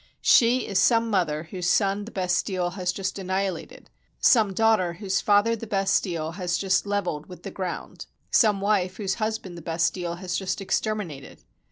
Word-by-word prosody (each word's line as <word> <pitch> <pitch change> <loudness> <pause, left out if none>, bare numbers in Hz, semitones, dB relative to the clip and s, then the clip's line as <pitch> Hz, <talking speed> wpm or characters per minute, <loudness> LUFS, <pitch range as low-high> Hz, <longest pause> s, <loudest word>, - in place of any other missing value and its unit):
She 245 +2 +5
is 195 -1 0
some 230 +1 +3
mother 155 -6 0
whose 180 -2 -2
son 200 +1 +1
the 230 - -10
Bastille 180 -1 -1
has 180 -1 -2
just 190 +1 -4
annihilated, 190 -2 -3 0.3
some 220 -5 +4
daughter 215 -4 +2
whose 190 +2 -2
father 205 +3 +3
the 230 0 -8
Bastille 185 -5 0
has 175 0 -2
just 190 +1 +1
lev 205 -1 0
elled 150 -3 -4
with 180 - -12
the 195 - -6
ground, 185 -2 -6 0.2
some 210 -4 +4
wife 195 -3 0
whose 195 -3 -1
husband 215 -5 -3
the - - -11
Bas 165 +1 0
tille 175 -2 -4
has 180 0 -4
just 190 +1 -2
exterminated. 195 -7 -3
190 Hz, 175 wpm, -25 LUFS, 180-205 Hz, 0.3 s, She